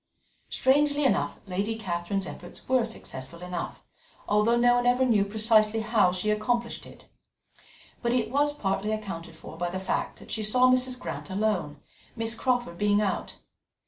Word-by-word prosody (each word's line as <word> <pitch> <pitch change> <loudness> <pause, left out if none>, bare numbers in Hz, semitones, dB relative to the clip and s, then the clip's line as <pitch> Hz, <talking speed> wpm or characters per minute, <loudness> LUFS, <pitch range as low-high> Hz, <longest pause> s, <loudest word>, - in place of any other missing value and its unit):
Strangely 290 +2 +2
enough, 260 - +1
Lady 200 +4 -2
Catherine's 190 -1 -2
efforts 175 -1 -10
were 255 -2 +3
successful 170 - -8
enough, 180 -1 -5 0.4
although 210 +3 +3
no 245 0 +5
one 245 0 +2
ever 250 +1 +4
knew 220 -5 +4
precisely 215 +1 +3
how 215 -4 +3
she 185 +4 0
accomplished 235 +2 -1
it. - - -15 1.0
But 235 - 0
it 235 -3 0
was 290 +2 +2
partly 200 -6 -1
accounted 170 -6 -6
for 160 - -11
by 175 +1 -1
the 185 +2 -4
fact 190 - -2
that - - -12
she 220 - -1
saw 250 +4 +4
Mrs. 255 0 +1
Grant - - -6
alone, 190 -8 -1 0.3
Miss 225 -1 0
Crawford 245 -8 -1
being 205 0 +3
out. 205 -2 -2
215 Hz, 160 wpm, -27 LUFS, 190-245 Hz, 1.0 s, no